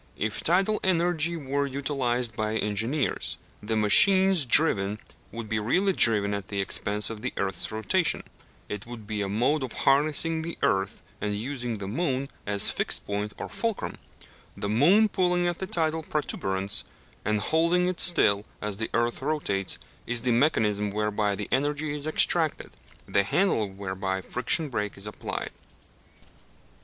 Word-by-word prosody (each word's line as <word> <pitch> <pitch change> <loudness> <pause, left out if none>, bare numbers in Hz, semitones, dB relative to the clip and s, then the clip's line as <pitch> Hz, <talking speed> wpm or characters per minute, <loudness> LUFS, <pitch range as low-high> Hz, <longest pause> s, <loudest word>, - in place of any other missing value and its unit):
If 105 0 -3
tidal 190 +5 +1
energy 170 -2 +1
were 140 -1 -2
utilized 130 -4 -2
by 110 0 -2
engineers, 110 +7 -1 0.2
the 110 +2 -2
machines 190 - +6
driven 105 -7 +3 0.3
would 115 -1 -7
be 110 0 -1
really 185 - +1
driven 105 - +4
at 100 -2 -5
the 100 - -4
expense 105 +2 -1
of 110 -2 -8
the - - -3
earth's 95 0 -2
rotation: 155 - 0 0.4
it 105 +1 -6
would 120 -3 -9
be 105 0 -3
a 100 - -2
mode 125 +9 +1
of 130 -3 -5
harnessing 155 +3 +1
the 165 +1 -5
earth 95 +2 0 0.2
and 105 -1 -2
using 120 0 -4
the 100 -1 -6
moon 135 - -2 0.2
as 100 -1 +4
fixed - - 0
point 105 +1 -4
or - - -6
fulcrum; 230 -3 -4 0.6
the 100 - -3
moon 165 - +4
pulling 180 -3 0
at 175 -1 -3
the 190 - -4
tidal 160 -2 -1
protuberance, 100 -11 -1 0.4
and 105 0 0
holding 170 - +1
it 180 -2 -3
still 100 - +5 0.2
as 105 -2 -4
the 110 +1 -3
earth 120 +1 0
rotates, 130 -11 0 0.3
is 120 -1 +1
the 125 - +1
mechanism 110 -6 +1
whereby 105 0 -1
the 105 0 -5
energy 145 +2 -1
is 150 +1 -4
extracted, 155 0 +2 0.4
the 100 - +2
handle 110 - 0
whereby 95 0 -4
the - - -21
friction 125 +6 0
brake 105 -7 -4
is 100 - -4
applied. 105 - -6
120 Hz, 155 wpm, -26 LUFS, 105-155 Hz, 0.6 s, machines